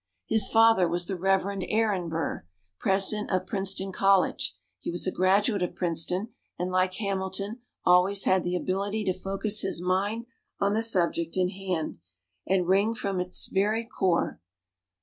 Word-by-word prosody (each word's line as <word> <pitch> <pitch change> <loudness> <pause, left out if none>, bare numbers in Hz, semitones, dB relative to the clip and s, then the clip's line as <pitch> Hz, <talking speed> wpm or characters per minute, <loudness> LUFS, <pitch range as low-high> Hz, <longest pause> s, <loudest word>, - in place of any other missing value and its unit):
His 220 -2 +3
father 225 -5 +5
was 175 +1 -1
the 190 - -3
Reverend 195 +1 0
Aaron 210 -6 0
Burr, 160 - -3 0.4
President 200 +2 +2
of 185 -1 0
Princeton 195 -2 -1
College. 195 0 +2 0.2
He - - -5
was 175 0 +1
a 185 - 0
graduate 200 +3 +2
of 180 - -2
Princeton, 180 +4 0 0.3
and, 180 +1 -2
like 185 0 +1
Hamilton, 195 +2 -3 0.3
always 185 +2 +4
had 185 -1 +2
the 175 0 -1
ability 200 +4 -2
to 185 - +1
focus 195 +3 -1
his 190 - -2
mind 195 +6 -1 0.3
on 200 0 +1
the 220 - +1
subject 170 -6 0
in 180 -1 +2
hand, 185 - -4 0.5
and 185 -1 +1
wring 200 +5 +2
from 195 -4 -2
it 180 - -2
its 180 - 0
very 215 +4 0
core. 190 -7 -1
190 Hz, 160 wpm, -27 LUFS, 180-205 Hz, 0.5 s, father